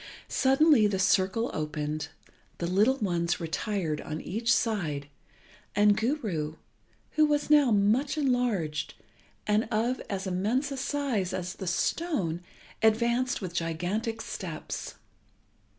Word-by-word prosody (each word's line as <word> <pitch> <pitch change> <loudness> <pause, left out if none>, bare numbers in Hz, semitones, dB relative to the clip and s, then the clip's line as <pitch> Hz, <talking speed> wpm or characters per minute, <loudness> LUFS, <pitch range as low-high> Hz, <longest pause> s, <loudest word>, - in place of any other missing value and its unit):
Suddenly 270 -3 +4
the 200 -2 -1
circle 190 +4 +2
opened, 150 0 -3 0.5
the 170 - -3
little 210 +9 +3
ones 175 -6 0
retired 165 -1 -2
on 155 0 -5
each 225 +9 -1
side, 160 -11 0 0.7
and 205 0 +5
Guru, 215 - -1 0.6
who 310 - +4
was 295 0 0
now 295 -4 +6
much 220 +8 +2
enlarged 245 - 0 0.5
and 210 +2 +2
of 235 +4 0
as 195 -1 -3
immense 215 +10 0
a 275 - -4
size 260 -9 -1
as 180 -1 -3
the 190 - -7
stone, 175 - 0 0.4
advanced 235 +3 +2
with 180 -2 -4
gigantic 180 +7 -2
steps. - - -6
210 Hz, 120 wpm, -28 LUFS, 175-250 Hz, 0.7 s, now